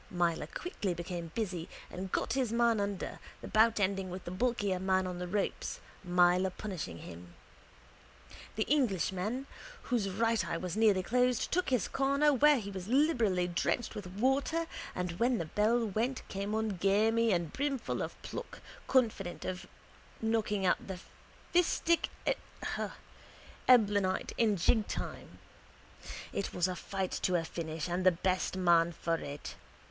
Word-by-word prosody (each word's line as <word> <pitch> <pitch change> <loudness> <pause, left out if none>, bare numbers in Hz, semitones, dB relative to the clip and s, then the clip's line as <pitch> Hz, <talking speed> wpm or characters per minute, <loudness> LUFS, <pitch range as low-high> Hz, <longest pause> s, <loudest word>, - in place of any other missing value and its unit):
Myler 170 -3 0
quickly 205 - -3
became 170 -1 -5
busy 180 -7 -3 0.2
and 185 +1 -5
got - - 0
his 255 -4 0
man 235 -1 +3
under, 200 -2 -3 0.2
the - - -7
bout 220 0 +4
ending 195 -1 0
with 185 +1 -7
the 175 - -5
bulkier 205 -2 0
man 190 0 +2
on 180 -1 -4
the 180 - -3
ropes, 200 +2 -2 0.2
Myler 180 +1 +4
punishing 185 - -5
him. 85 0 -11 1.2
The 220 - +1
Englishman, 220 - 0 0.4
whose 230 -6 0
right 225 +3 +1
eye - - -2
was 180 +1 -4
nearly 210 -4 +4
closed, 250 +3 +1
took 365 +1 +1
his 250 -7 +1
corner 280 +2 +3
where 295 +2 +6
he 200 -4 -5
was 190 -1 -6
liberally 235 - +3
drenched 180 +6 -1
with 205 -3 -6
water 270 - +1 0.3
and 180 -1 -2
when 245 +1 +3
the 165 - -2
bell 220 +8 +2
went 225 +6 -2
came 200 +2 -2
on 220 -3 -1
gamey 220 +5 +3
and 170 -4 0
brimful 275 -2 -1
of - - -5
pluck, - - -7 0.3
confident 220 -8 +1
of 180 -1 -4 0.5
knocking 220 -3 0
out 180 - +1
the 190 -2 -4 0.6
fistic 340 -1 +3 1.6
Eblanite 205 -6 +4
in 220 -3 +3
jigtime. 210 +5 -1 1.0
It 200 - -3
was 180 0 +2
a 185 - -3
fight 190 +1 -3
to 180 - +1
a 170 - +2
finish 160 -1 -4
and 175 +1 -1
the 185 - +7
best 185 +2 -1
man 170 -2 +4
for 165 0 -1
it. 145 -2 -7
200 Hz, 150 wpm, -32 LUFS, 180-230 Hz, 1.6 s, the